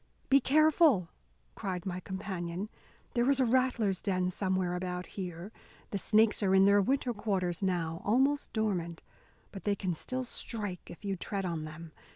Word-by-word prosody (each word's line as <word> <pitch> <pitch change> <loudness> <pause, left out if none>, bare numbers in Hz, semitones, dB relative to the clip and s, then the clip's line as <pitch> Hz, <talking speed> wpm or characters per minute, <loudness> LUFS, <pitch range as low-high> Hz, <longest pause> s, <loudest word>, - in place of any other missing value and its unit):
"Be 275 +1 +7
careful," 295 - +4 0.4
cried 185 -4 -4
my 185 -1 -3
companion, 190 0 -4 0.4
"there 240 +1 +2
is 275 -1 +3
a 260 - +4
rattlers' 235 -6 +1
den 185 -2 0
somewhere 185 -1 0
about 180 0 -3
here. 180 0 -6 0.4
The 200 - -1
snakes 215 +2 +3
are 190 -2 +3
in 190 0 +6
their 200 0 +6
winter 260 +3 +1
quarters 190 -5 -1
now, 170 -3 -1
almost 270 +7 +2
dormant, 180 -7 -2 0.5
but 195 - -9
they 205 -1 +1
can 185 -3 -2
still 255 +10 -3
strike 210 -6 -4
if 175 - -11
you 195 -1 -1
tread 195 +1 -3
on 165 -3 -3
them. 155 +1 -9
195 Hz, 165 wpm, -31 LUFS, 180-225 Hz, 0.5 s, Be